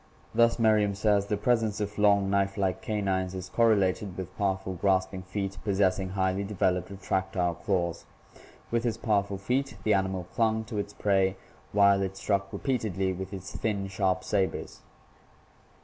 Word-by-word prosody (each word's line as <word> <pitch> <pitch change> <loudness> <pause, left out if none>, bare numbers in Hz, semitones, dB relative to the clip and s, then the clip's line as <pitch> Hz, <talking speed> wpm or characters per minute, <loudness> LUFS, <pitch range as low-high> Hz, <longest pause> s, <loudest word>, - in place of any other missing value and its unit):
Thus 115 +1 +4
Merriam 105 -3 +3
says: 100 -1 +2
"The 105 - 0
presence 110 -1 +1
of 105 0 -4
long, 100 -1 +4
knife 100 0 +1
like 95 -2 0
canines 95 -3 -1
is 95 0 -6
correlated 100 -4 +2
with 95 0 -6
powerful 95 -1 -1
grasping 95 0 0
feet 95 0 -4
possessing 95 -1 +1
highly 95 +1 0
developed 95 -3 0
retractile 95 -2 -1
claws. 90 -5 -1 0.7
With 115 0 +1
its 115 -2 -1
powerful 100 -4 0
feet 125 +4 -1
the 110 - +3
animal 95 -2 0
climg 110 -1 +1
to 110 -4 -2
its 100 0 -4
prey 95 -2 +1 0.3
while 100 -1 +5
it 95 0 -3
struck 100 -1 -1
repeatedly 105 -8 -1
with 95 +1 -6
its 95 -1 -8
thin, 100 -3 -1
sharp 95 -1 0
sabers." 95 -2 -2
100 Hz, 150 wpm, -28 LUFS, 95-105 Hz, 0.7 s, while